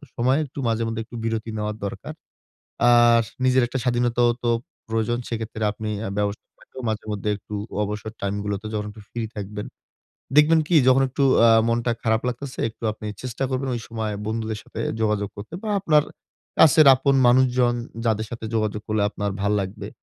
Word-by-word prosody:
সময়ে 130 +4 +2
একটু 140 0 -9
মাঝে 115 0 0
মধ্যে 115 0 -3
একটু 120 - -12
বিরতি 115 0 -2
নেওয়ার 105 0 -2
দরকার। 100 - -6 0.8
আর 120 -1 +6 0.2
নিজের 130 0 +4
একটা 130 +2 -3
স্বাধীনতাও 120 0 +2
তো 120 - +1 0.4
প্রয়োজন। 115 +1 0
সেই 115 - -2
ক্ষেত্রে 110 0 -6
আপনি 105 +1 -5
অ্যা 100 - -3
ব্যবসা 105 0 -2 0.2
থেকেও 130 - -11
মাঝে 110 -1 -2
মধ্যে 105 0 -3
একটু 105 - -10 0.3
অবসর 105 +1 -4
টাইমগুলোতে 100 +1 -3
যখন 105 -1 -2
একটু 105 +1 -13
ফ্রি 120 - -5 0.2
থাকবেন। 105 0 -5 0.7
দেখবেন 155 +2 +6
কি 175 - +1
যখন 130 +1 +5
একটু 135 +2 0 0.2
আ - - +7 0.2
মনটা 120 +1 +1
খারাপ 110 -1 +2
লাগতেসে, 130 +2 -5
একটু 115 - -13
আপনি 110 0 -9 0.2
চেষ্টা 130 +1 -3
করবেন 130 +1 -1
ওই 120 - -3
সময়ে 110 -2 -3
বন্ধুদের 110 -1 -2
সাথে 110 - -8 0.2
যোগাযোগ 105 -2 0
করতে 100 +6 -9
বা 220 - -3
আপনার 155 -5 +4 0.6
কাছের 155 -1 +7
আপন 135 +1 +1
মানুষজন, 125 -1 +4 0.3
যাদের 110 -1 +1
সাথে 115 -1 -7
যোগাযোগ 105 -1 0
করলে 110 -1 +1
আপনার 105 -1 -3
ভাল্লাগবে, 100 -1 -1
115 Hz, 175 wpm, -23 LUFS, 105-125 Hz, 0.8 s, আ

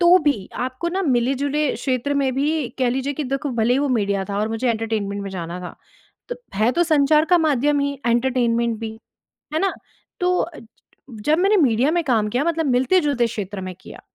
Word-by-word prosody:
तो 350 +1 +7
भी 285 - 0
आपको 255 +7 -3
ना 375 +3 -1
मिले-जुले 275 +1 +1
क्षेत्र 265 +1 -1
में 275 -2 +1
भी 290 -1 0
कह 255 -2 +2
लीजिए 265 +3 -1
कि 300 +1 -3
देखो 275 +3 -2
भले 225 +2 +3
ही - - +2
वो 290 - 0
मीडिया 200 -5 0
था 200 - -2
और 215 - 0
मुझे 225 +3 -1
एंटरटेनमेंट 215 -3 -2
में 200 - -5
जाना 175 -1 -5
था, 180 - -8 0.6
त - - -14 0.2
है 220 +4 +3
तो 345 +5 +2
संचार 305 -1 +3
का 355 +1 +4
माध्यम 295 -2 +2
ही 280 0 0
एंटरटेनमेंट 235 -1 +1
भी, 225 -1 -4 0.6
है 315 - +1
ना? 390 0 +1 0.5
तो 360 0 +2
अ, 335 -2 -4 0.5
जब 245 +8 0
मैंने 395 +3 +3
मीडिया 250 +2 +3
में 345 - +1
काम 225 -6 +1
किया 245 +6 0
मतलब 330 -1 0
मिलते-जुलते 265 0 +2
क्षेत्र 205 -3 -5
में 185 -1 -6
किया। - - -12
260 Hz, 200 wpm, -21 LUFS, 225-300 Hz, 0.6 s, तो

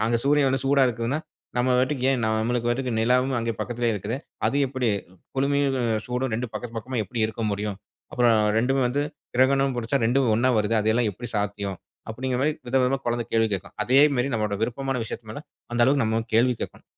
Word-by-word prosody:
அங்க 115 0 +2
சூரியன் 145 -1 +4
வந்து 135 - -1
சூடா 135 0 +4
இருக்கிதுன்னா 120 +4 -2 0.4
நம்ம 125 +1 +2
பாட்டுக்கு 130 0 0
ஏன் 125 - -1
நம்ளுக்கு 115 +2 0
பாட்டுக்கு 125 0 -1
நிலாவும் 125 +3 +2
அங்கே 115 0 -1
பக்கத்திலேயே 120 -1 -1
இருக்குதே! 105 +5 -3 0.3
அது 140 - -1
எப்படி, 130 -2 -1 0.5
குளுமையும் 140 0 +1 0.3
சூடும் 125 0 -2
2ம் 120 0 -3
பக்கத்து 115 +1 -6
பக்கமா 125 +1 -4
எப்படி 115 +4 -5
இருக்க 115 +1 -6
முடியும்? 100 0 -3 0.4
அப்புறம் 120 -2 +4 0.2
2 135 +4 +1
வந்து 140 +4 0 0.3
கிரகணம் 135 +1 +3
பிடிச்சா 120 +3 0
2 125 0 +2
ஒன்னா 120 +3 +2
வருதே 105 +1 +1
அதெல்லாம் 110 +2 +2
எப்படி 120 +6 -8
சாத்தியம்?" 100 -2 -2 0.3
அப்படிங்கிற 125 +2 -2
மாதிரி 150 +3 +2
விதவிதமா 130 +1 +2
குழந்தை 120 0 0
கேள்வி 115 0 +3
கேட்கும். 100 0 -4
அதே 125 +5 +2 0.2
மாரி 125 +2 +1
நம்மளோட 105 -2 -1
விருப்பமான 135 +2 -1
விஷயத்து 110 0 -7
மேல 115 - -6 0.3
அந்த 120 - 0
அளவுக்கு 140 +1 +3
நம்ம 110 +1 +1
கேள்வி 125 +2 +4
கேட்கணும். - - -8
120 Hz, 185 wpm, -25 LUFS, 115-130 Hz, 0.5 s, சூரியன்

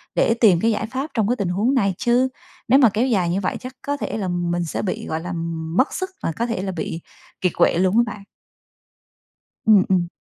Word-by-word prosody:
để - - +3
tìm 190 -7 +6
cái 230 - +3
giải 220 - -1
pháp 265 +6 -4
trong 220 -4 +1
cái 245 - +2
tình 200 -7 -2
huống 210 +9 +1
này 200 -6 +2
chứ 245 +2 +2 0.4
nếu 265 +4 +6
mà 245 -5 +6
kéo 225 +6 0
dài 190 -8 +1
như 185 +3 0
vậy 185 - -2
chắc 255 +1 -9
có 285 0 -2
thể 245 - -4
là 195 - -2
mình 175 -1 -1
sẽ - - -3
bị, 190 - -3
gọi 160 - -2
là, 180 +2 -5 0.4
mất 260 - +3
sức 375 0 -3
mà 165 - 0
có 230 +9 -2
thể 230 -5 -2
là 190 0 -3
bị 165 -1 -4 0.4
kiệt 180 -2 +1
quệ - - +3
luôn 185 +4 +2
á 235 - +6
bạn. 200 - -12 1.4
Ừm, 210 -3 +6
ừm. 180 -2 +2
205 Hz, 235 wpm, -22 LUFS, 180-240 Hz, 1.4 s, tìm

